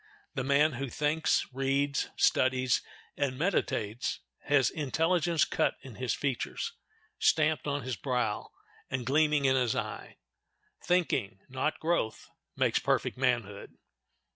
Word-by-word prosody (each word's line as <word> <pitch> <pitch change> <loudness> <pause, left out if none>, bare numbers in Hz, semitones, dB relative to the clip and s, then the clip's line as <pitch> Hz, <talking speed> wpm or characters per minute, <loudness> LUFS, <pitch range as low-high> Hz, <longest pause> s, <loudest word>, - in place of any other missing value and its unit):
The 130 - -2
man 140 +3 +4
who 135 +2 -4
thinks, 150 +4 +1
reads, 135 +1 0
studies, 130 -1 +3 0.3
and 135 -3 -1
meditates 120 - -1 0.3
has 145 -5 +3
intelligence 165 +2 +1
cut - - 0
in 130 -6 -11
his 125 -1 -1
features, 135 -4 -2 0.5
stamped 155 -2 +2
on 145 -1 -1
his 130 -1 -3
brow, 120 0 -1 0.4
and 130 -2 -3
gleaming 150 +1 +3
in 130 0 +4
his 125 -4 +1
eye. - - -5 0.7
Thinking, 155 - 0
not 130 +4 -1
growth, 160 -9 -1 0.2
makes - - +2
perfect - - 0
manhood. 120 -6 -1
135 Hz, 120 wpm, -30 LUFS, 125-150 Hz, 0.7 s, man